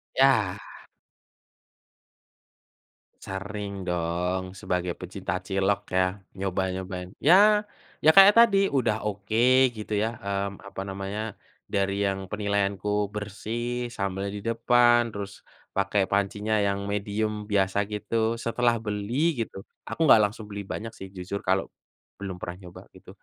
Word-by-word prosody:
Yah. 115 -8 +4 2.7
Sering 100 0 -5
dong, 90 +1 -2
sebagai 90 -2 -2
pecinta 95 0 -5
cilok 95 +2 -1
ya, 95 +1 0 0.2
nyoba-nyobain, 95 -1 -3 0.2
ya 210 +3 +6 0.3
ya 155 - +5
kayak 195 +1 +10
tadi, 230 -4 +6
udah 115 -6 0
oke 105 +1 -4 0.4
gitu 110 0 -8
ya, - - +1 0.2
mmm, 100 0 -3
apa 95 - -6
namanya, 100 +2 -4 0.5
dari 100 0 +1
yang 95 0 -4
penilaianku 100 -1 -1 0.2
bersih 120 +4 -4
sambel 100 -1 -3
di 105 - -5
depan, 120 +2 +3
terus 100 -1 -7 0.3
pakai 100 0 +1
pancinya 100 +2 0
yang 100 0 0
medium 105 +1 -2
biasa 95 -1 +2
gitu, 105 +2 -4 0.2
setelah 115 0 +1
beli 115 +9 -1
gitu 100 - -12 0.3
aku - - -6
nggak 110 - +8
langsung 105 +1 -2
beli 100 0 -5
banyak 115 +1 -5
sih 95 - -8
jujur 95 +2 -4
kalau 95 +1 +3 0.6
belum 95 -2 -5
pernah 90 0 -5
nyoba 90 0 -11
gitu, - - -16
100 Hz, 125 wpm, -26 LUFS, 95-110 Hz, 2.7 s, kayak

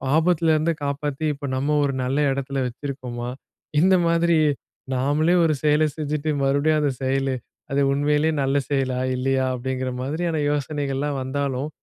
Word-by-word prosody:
ஆபத்துல 165 0 +3
இருந்து 160 +2 +1
காப்பாத்தி, 145 +1 -2
இப்போ 140 - -7
நம்ப 140 +3 0
ஒரு 135 - -1
நல்ல 130 +2 -1 0.2
இடத்துல 135 0 -3
வச்சிருக்கோமா?" 125 -2 -5 0.5
இந்த 190 +2 +5
மாதிரி 170 0 +3 0.6
நாம்பளே 150 +7 +2
ஒரு 160 - +3
செயலை 150 +1 +4
செஞ்சுட்டு, 150 0 -2
மறுபடியும் 145 +3 +2
அந்த 145 -2 +1
செயல் 135 0 +1 0.4
அது 140 - +2
உண்மையிலே 150 +2 +2
நல்ல 135 0 +1
செயலா? 135 -3 0 0.2
இல்லயா? 130 +1 +1
அப்படிங்குற 130 +1 -3
மாதிரியான 160 +5 -1
யோசனைகள்லாம் 145 -1 -1
வந்தாலும், 135 +1 -2
140 Hz, 135 wpm, -23 LUFS, 135-155 Hz, 0.6 s, இந்த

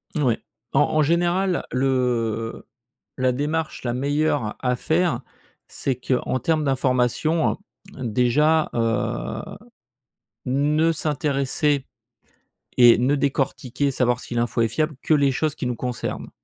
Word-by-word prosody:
Oui. 130 -7 +2 0.4
En 135 - +4
en 155 +1 +2
général, 175 +3 +1
le 120 -4 -1 0.5
la 130 0 +2
démarche 155 +5 -2
la 120 -1 -1
meilleure 145 -3 0
à 125 -1 0
faire, 160 0 0 0.5
c'est 135 -2 -2
qu'en 125 +1 -1
termes 160 +2 +1
d'informations, 135 +4 +1
heu, - - -11 0.5
déjà, 130 +7 +2
heu, 115 -1 -1 1.0
ne 150 +5 +2
s'intéresser 145 -2 0 0.9
et 120 -2 +8
ne 130 +4 +2
décortiquer, 140 -1 -1
savoir 125 -2 +1
si 120 - -7
l'info 120 0 0
est 115 - +2
fiable, 155 +6 -1
que 155 - +3
les 140 -2 +3
choses 155 +2 -1
qui - - -4
nous 125 -1 -2
concernent. 125 -2 -4
135 Hz, 125 wpm, -23 LUFS, 125-150 Hz, 1.0 s, et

